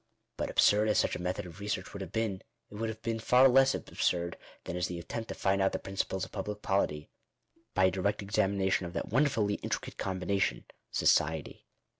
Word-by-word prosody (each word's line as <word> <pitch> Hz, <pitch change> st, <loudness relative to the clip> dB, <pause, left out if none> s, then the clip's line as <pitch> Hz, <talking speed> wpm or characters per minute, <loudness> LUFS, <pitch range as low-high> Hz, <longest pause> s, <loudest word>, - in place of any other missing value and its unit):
But -, -, -3 dB
absurd 105 Hz, +1 st, +4 dB
as 105 Hz, -, +2 dB
such -, -, +2 dB
a -, -, -5 dB
method 90 Hz, 0 st, -2 dB
of 85 Hz, +1 st, -11 dB
research 100 Hz, -2 st, -3 dB
would 100 Hz, -, -6 dB
have 95 Hz, -, -6 dB
been, 110 Hz, -4 st, -1 dB, 0.3 s
it -, -, -12 dB
would 110 Hz, +2 st, -2 dB
have 110 Hz, 0 st, -7 dB
been 115 Hz, -1 st, -1 dB
far 125 Hz, +4 st, +6 dB
less 135 Hz, +1 st, +5 dB
absurd, 85 Hz, -1 st, -1 dB, 0.3 s
than 85 Hz, -, -5 dB
is 90 Hz, 0 st, 0 dB
the 90 Hz, -, -5 dB
attempt 115 Hz, +7 st, -5 dB
to -, -, -5 dB
find 95 Hz, 0 st, +1 dB
out 95 Hz, -, +2 dB
the -, -, 0 dB
principles 95 Hz, -1 st, -3 dB
of -, -, -15 dB
public 105 Hz, 0 st, -5 dB
polity, 75 Hz, -6 st, 0 dB, 0.6 s
by 95 Hz, -, +5 dB
a 95 Hz, -, +4 dB
direct 100 Hz, +3 st, -1 dB
examination 95 Hz, -2 st, +1 dB
of 85 Hz, -, -9 dB
that -, -, -3 dB
wonderfully 115 Hz, -5 st, +2 dB
intricate -, -, -4 dB
combination 95 Hz, +1 st, -1 dB, 0.2 s
— -, -, -50 dB
society. 80 Hz, -1 st, +1 dB
100 Hz, 205 wpm, -31 LUFS, 90-110 Hz, 0.6 s, far